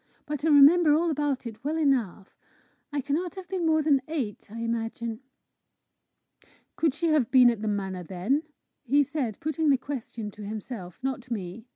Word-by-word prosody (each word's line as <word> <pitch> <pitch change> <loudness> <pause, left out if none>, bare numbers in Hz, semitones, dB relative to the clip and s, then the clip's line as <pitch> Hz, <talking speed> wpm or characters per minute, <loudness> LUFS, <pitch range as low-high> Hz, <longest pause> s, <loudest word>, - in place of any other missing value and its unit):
"But 295 -1 -4
I - - +2
remember 300 +2 +7
all 335 +1 +1
about 290 -3 -1
it 225 0 -8
well 305 +3 -1
enough. 245 - 0 0.6
I 290 -1 -1
cannot 305 +6 -2
have 380 -2 -8
been 365 -3 -1
more 315 -1 +3
than 285 -3 +3
eight, 265 -13 -4
I 230 +1 -6
imagine." 230 0 -3 1.6
"Could 315 -4 +1
she 335 0 0
have 300 -7 +2
been 250 -2 +7
at 225 -3 -5
the 220 - -2
manor 195 -3 -2
then?" 190 - -1 0.4
he 285 +2 +3
said, 270 -7 -3
putting 310 0 0
the 275 - +5
question 240 -5 -6
to 210 - -11
himself, 205 -3 -7
not 260 -2 -3
me. 215 +1 -5
265 Hz, 175 wpm, -27 LUFS, 220-300 Hz, 1.6 s, remember